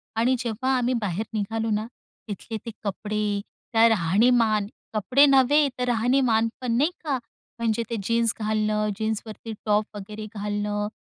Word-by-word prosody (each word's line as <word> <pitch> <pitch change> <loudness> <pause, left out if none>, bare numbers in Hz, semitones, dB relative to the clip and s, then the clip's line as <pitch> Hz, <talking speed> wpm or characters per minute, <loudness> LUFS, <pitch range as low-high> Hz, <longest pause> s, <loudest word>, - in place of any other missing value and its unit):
आणि 240 +3 +3
जेव्हा 250 +2 -1
आम्ही 250 0 +1
बाहेर 205 +1 -2
निघालो 225 +2 -1
ना 215 +1 -1 0.4
तिथले 220 +2 -5
ते 230 - -4
कपडे, 210 +1 -2 0.3
त्या 225 0 +6
राहणीमान. 215 +3 +3 0.3
कपडे 250 +7 +4
नव्हे 280 +2 +5
तर - - +1
राहणीमान 240 -1 +3
पण 250 -2 -1
नाही 300 +6 +3
का. 290 -4 0 0.4
म्हणजे 230 0 0
ते 230 - -2
जीन्स 230 +1 +2
घालणं, 215 0 0
जीन्सवरती 220 +1 -4
टॉप 210 0 +2
वगैरे 210 +2 -7
घालणं 205 0 -2
220 Hz, 140 wpm, -25 LUFS, 210-240 Hz, 0.4 s, त्या